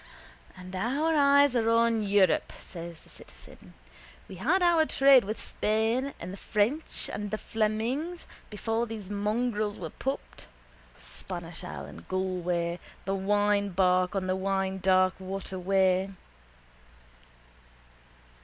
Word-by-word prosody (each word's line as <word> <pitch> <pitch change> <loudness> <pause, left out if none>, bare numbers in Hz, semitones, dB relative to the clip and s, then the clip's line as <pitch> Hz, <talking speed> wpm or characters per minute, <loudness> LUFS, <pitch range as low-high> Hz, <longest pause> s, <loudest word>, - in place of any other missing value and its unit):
—And 185 +1 -9
our 275 +11 0
eyes 285 -2 +5
are 225 -1 +2
on 230 -1 +3
Europe, 200 -4 +2
says 170 -2 -9
the - - -21
citizen. - - -13 0.5
We 190 - -10
had 320 - +2
our 340 -2 +5
trade 270 -4 +6
with 215 +3 -4
Spain 225 +6 0
and 180 +2 -7
the - - -8
French 225 +12 -1
and 210 - -3
with - - -5
the 215 - -2
Flemings 230 +12 -2 0.2
before 225 +2 -2
those 215 -3 -7
mongrels 210 0 -1
were 165 -3 -6
pupped, 270 +1 -5 0.5
Spanish 175 -1 -8
ale 180 - -6
in - - -12
Galway, 180 -2 -1 0.3
the 195 - -1
winebark 195 -2 +2
on 190 -1 -1
the 185 0 0
winedark 190 -1 +2
waterway. 190 0 0
205 Hz, 120 wpm, -28 LUFS, 185-230 Hz, 0.5 s, trade